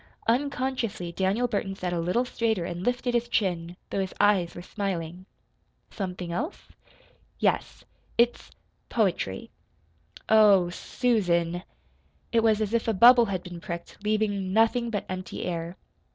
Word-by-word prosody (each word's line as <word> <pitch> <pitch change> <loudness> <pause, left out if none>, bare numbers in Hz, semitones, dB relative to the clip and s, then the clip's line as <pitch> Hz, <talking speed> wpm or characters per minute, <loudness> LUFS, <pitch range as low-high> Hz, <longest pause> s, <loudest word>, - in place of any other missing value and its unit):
Unconsciously 250 -7 -1
Daniel 195 +7 +1
Burton 195 -3 -2
sat 180 -2 -3
a 170 - -1
little 180 +9 +1
straighter 220 -7 -1
and 175 0 -5
lifted 245 +3 0
his 240 0 +1
chin 175 -5 -1
though - - -1
his 190 - -4
eyes 195 -4 +3
were 175 - -7
smiling. 185 -3 -4 0.6
"Something 180 -4 -5
else?" 300 - -4 0.7
"Yes. - - -1 0.3
It's 235 +1 +2 0.4
poetry." 180 - -1 0.8
"Oh, 205 -5 +6
SUSAN!" 175 -6 0 0.7
It 230 - +3
was 220 -1 +3
as 215 0 -1
if 235 0 +1
a 225 - +1
bubble 240 +4 +8
had 190 -4 -3
been 175 -2 -9
pricked, 170 +4 -7
leaving 210 -3 0
nothing 225 +3 +3
but 205 -4 -3
empty 185 0 -5
air. 170 0 -4
200 Hz, 135 wpm, -27 LUFS, 175-230 Hz, 0.8 s, bubble